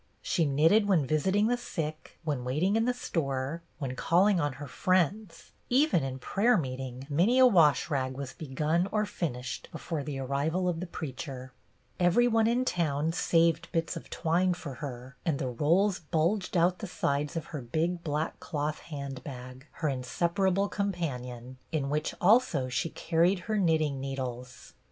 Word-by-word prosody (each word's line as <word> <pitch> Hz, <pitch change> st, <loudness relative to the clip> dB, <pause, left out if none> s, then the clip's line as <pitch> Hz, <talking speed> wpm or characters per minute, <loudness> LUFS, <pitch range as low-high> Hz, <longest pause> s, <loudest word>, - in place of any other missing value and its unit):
She 165 Hz, -3 st, +1 dB
knitted 160 Hz, +10 st, +4 dB
when 175 Hz, -8 st, +3 dB
visiting 190 Hz, +9 st, +2 dB
the 245 Hz, +2 st, +2 dB
sick, 155 Hz, -9 st, -5 dB
when 145 Hz, -5 st, -2 dB
waiting 155 Hz, +11 st, +1 dB
in 225 Hz, 0 st, +2 dB
the 250 Hz, -, +3 dB
store, 140 Hz, -, -2 dB, 0.2 s
when 135 Hz, -4 st, -4 dB
call 175 Hz, +8 st, +3 dB
ing 205 Hz, -4 st, +3 dB
on 145 Hz, -3 st, 0 dB
her 145 Hz, +2 st, -8 dB
friends; 185 Hz, +5 st, 0 dB, 0.2 s
even 270 Hz, -, +3 dB
in 130 Hz, -1 st, -3 dB
prayer 215 Hz, -, +2 dB
meeting 130 Hz, -3 st, -4 dB
many 175 Hz, -, +3 dB
a 260 Hz, -, +8 dB
wash 165 Hz, -, +5 dB
rag 130 Hz, -2 st, -2 dB
was 140 Hz, -2 st, -5 dB
begun 155 Hz, +5 st, 0 dB
or 215 Hz, 0 st, +1 dB
finished 130 Hz, -10 st, -4 dB
before 160 Hz, -4 st, -4 dB
the 140 Hz, -1 st, -5 dB
arrival 140 Hz, +7 st, -1 dB
of 170 Hz, -2 st, 0 dB
the 180 Hz, -, -4 dB
preacher. 130 Hz, -4 st, -6 dB, 0.5 s
Every 180 Hz, +7 st, +4 dB
one 225 Hz, -1 st, +3 dB
in 245 Hz, +2 st, +2 dB
town 160 Hz, -, 0 dB
saved 165 Hz, -1 st, +2 dB
bits 165 Hz, -1 st, -1 dB
of -, -, -8 dB
twine 175 Hz, +3 st, +1 dB
for 155 Hz, -6 st, -7 dB
her, 125 Hz, -2 st, -7 dB
and 155 Hz, -4 st, 0 dB
the 130 Hz, -, -2 dB
rolls 170 Hz, -, +2 dB
bulged 175 Hz, +5 st, 0 dB
out 175 Hz, +2 st, +3 dB
the 215 Hz, -, -5 dB
sides 145 Hz, -3 st, -1 dB
of 165 Hz, -1 st, -3 dB
her 150 Hz, -, -3 dB
big 165 Hz, +8 st, -1 dB
black 150 Hz, 0 st, -2 dB
cloth 150 Hz, -1 st, -3 dB
handbag, 135 Hz, -2 st, -8 dB
her 160 Hz, -, -2 dB
inseparable 170 Hz, +9 st, 0 dB
companion, 130 Hz, -, -4 dB
in 145 Hz, -4 st, -1 dB
which 150 Hz, +1 st, -1 dB
also 200 Hz, -, +3 dB
she 125 Hz, +6 st, -1 dB
carried 175 Hz, +4 st, +1 dB
her 215 Hz, +1 st, -1 dB
knitting 155 Hz, -6 st, +2 dB
needles. 125 Hz, -2 st, -6 dB
160 Hz, 165 wpm, -29 LUFS, 135-180 Hz, 0.5 s, a